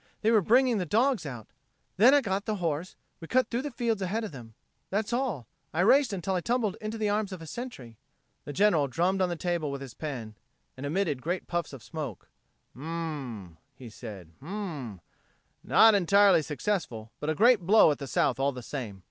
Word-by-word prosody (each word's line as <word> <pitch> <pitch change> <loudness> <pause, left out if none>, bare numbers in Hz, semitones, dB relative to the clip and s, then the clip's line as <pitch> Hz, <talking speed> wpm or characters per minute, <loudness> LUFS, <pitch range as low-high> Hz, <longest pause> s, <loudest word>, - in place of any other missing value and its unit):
They 220 - +3
were 220 -2 +5
bringing 240 +3 +3
the 180 - -1
dogs 230 - +2
out. 120 -6 -7 0.5
Then 245 +8 +7
I 290 - +5
got 195 -3 -2
the 215 - -1
horse; 170 -1 -3 0.2
we 165 - -9
cut 255 +2 +1
through 240 +2 0
the 295 - -4
fields 235 -5 -1
ahead 205 +5 -1
of 215 - -5
them. 115 -5 -11 0.3
That's 205 +3 -1
all. 235 - -2 0.3
I 170 - +2
raced 265 +6 +5
until 190 -1 -2
I 180 - 0
tumbled 230 -2 0
into 215 +1 -4
the 215 -1 0
arms 205 -1 0
of 185 - -6
a 165 - -9
Sentry." 145 - -8 0.4
The - - -7
General 165 -4 +3
drummed 180 +8 0
on 185 - +2
the 175 - -2
table 170 -3 -2
with 140 0 -4
his 135 -4 -8
pen, 120 -7 -6 0.4
and 135 +1 -5
emitted 155 -4 -1
great 175 +5 -2
puffs 175 -1 -3
of 135 -6 -10
smoke. 145 - -7 0.4
"Hm 130 - -13
m 155 - -6 0.6
m!" 80 - -23 0.2
he 120 -3 -11
said. 100 -8 -10
"Hm 140 - -13
m 200 -2 -4 0.2
m! 90 - -16 0.6
Not 225 0 +6
entirely 200 -1 +5
successful, 150 - -3
but 150 - -3
a 155 - 0
great 235 +5 +5
blow 190 -1 +5
at 145 - -3
the 140 - -6
South - - +1
all 140 +1 +2
the 125 -2 -8
same. 115 -8 -6
180 Hz, 215 wpm, -28 LUFS, 140-215 Hz, 0.6 s, Then